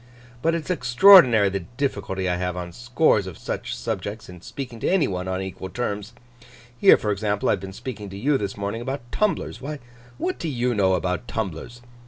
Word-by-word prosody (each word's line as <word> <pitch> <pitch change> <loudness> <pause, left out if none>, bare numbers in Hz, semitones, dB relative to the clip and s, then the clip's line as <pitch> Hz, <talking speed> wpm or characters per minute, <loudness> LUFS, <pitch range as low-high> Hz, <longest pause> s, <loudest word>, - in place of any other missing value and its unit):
'But 165 +3 +2
it's 170 +2 -3
extraordinary 125 - +7
the 100 0 -2 0.2
difficulty 100 -9 -2
I 90 -1 0
have 90 0 -3
on 90 -1 -5
scores 120 - +2
of 90 - -8
such - - -4
subjects, 110 +1 -5
in 90 -1 -11
speaking 125 +1 -7
to - - 0
any 190 -4 +3
one 90 -1 -4
on 95 0 -2
equal 95 0 -7
terms. 105 +1 -4 0.6
Here, 120 - +7
for 105 - -2
example, 105 0 -1
I - - +5
have 100 - +1
been 95 +1 -8
speaking 105 -1 -7
to 95 - -8
you 135 +6 +1
this 100 -1 -4
morning 100 +3 -3
about 120 -1 -5
tumblers. 210 -1 -1
Why, 150 +3 -5 0.4
what 365 +3 -2
do 165 - -3
you 125 -2 0
know 95 -3 +3
about 90 +5 -2
tumblers? 110 +4 -5
110 Hz, 200 wpm, -24 LUFS, 95-130 Hz, 0.6 s, extraordinary